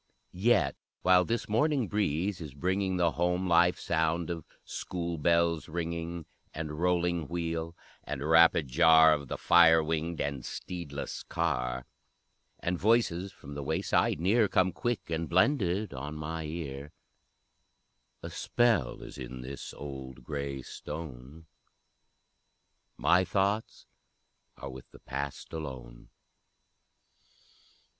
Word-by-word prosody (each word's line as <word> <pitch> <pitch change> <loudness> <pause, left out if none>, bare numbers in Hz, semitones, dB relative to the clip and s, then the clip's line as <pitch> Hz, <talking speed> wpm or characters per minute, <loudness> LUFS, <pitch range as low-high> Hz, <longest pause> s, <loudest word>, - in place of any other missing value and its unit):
Yet, 95 - +2 0.3
while 90 0 +6
this 115 0 -2
morning 125 +3 +2
breeze 95 -2 -1
is 75 -4 -8
bringing 95 +4 0
The 85 -2 +3
home 90 +2 0
life 90 +1 +4
sound 80 +1 0
of 80 -3 -5 0.2
school 85 -2 -4
bells 85 0 +2
ringing, 85 0 -4 0.3
And 75 0 -5
rolling 85 -2 +1
wheel, 85 0 -3 0.3
and 70 +3 -4
rapid 80 -2 +6
jar 80 +3 +6
Of 70 -2 -3
the - - -4
fire 80 -2 +6
winged 80 +1 -2
and 70 -3 -2
steedless 80 -4 -6
car, 60 0 -1 0.8
And 90 0 -1
voices 100 -4 +2
from 70 -5 -11
the 70 - -5
wayside 80 +2 +1
near 105 +6 +3
Come 95 -1 +2
quick 120 +5 -2
and 80 0 -2
blended 95 - +2
on 70 +4 -6
my 80 +1 -4
ear, 75 -3 -6 1.3
A - - -6
spell 110 - +1
is - - -10
in 65 0 -7
this 65 +2 -7
old 65 -3 -8
gray 70 -1 -4
stone, 75 0 -8 1.5
My 90 +2 +4
thoughts 100 +3 -1 0.7
are 70 - -7
with 65 0 -11
the - - -15
Past 70 +3 -5
alone! 65 -6 -7
80 Hz, 120 wpm, -30 LUFS, 70-90 Hz, 1.5 s, while